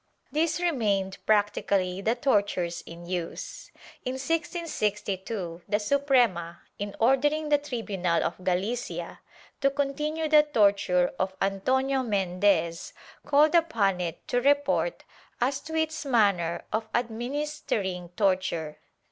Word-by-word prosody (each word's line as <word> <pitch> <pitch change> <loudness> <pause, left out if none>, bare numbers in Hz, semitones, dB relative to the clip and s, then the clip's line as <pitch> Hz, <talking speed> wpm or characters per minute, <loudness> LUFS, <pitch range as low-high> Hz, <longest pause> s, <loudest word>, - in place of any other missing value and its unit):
These 315 +4 +1
remained 210 - 0
practically 200 -3 +1
the 225 +4 +1
tortures 200 -9 0
in 170 +1 -10
use. 180 - -5 0.3
In 255 - -2
1662 210 - -2
the 205 - +2
Suprema, 225 -9 +1 0.2
in 205 0 -4
ordering 295 +6 +2
the 290 -1 +4
tribunal 205 -11 -1
of 185 - -4
Galicia 195 +7 -2 0.4
to 275 - +4
"continue" 300 +3 -1
the 305 0 +7
torture 200 -10 +2
of 190 0 -1
Antonio 260 +8 +1
Mendez, 185 -6 0 0.3
called 295 +2 +5
upon 220 - +2
it 170 -2 -5
to 245 - +1
report 285 - +2 0.4
as 265 +3 +1
to 320 +3 -7
its 315 0 -1
manner 200 - +2
of 220 0 -1
administering 235 - -2
torture. 185 -6 0
220 Hz, 115 wpm, -27 LUFS, 190-285 Hz, 0.4 s, the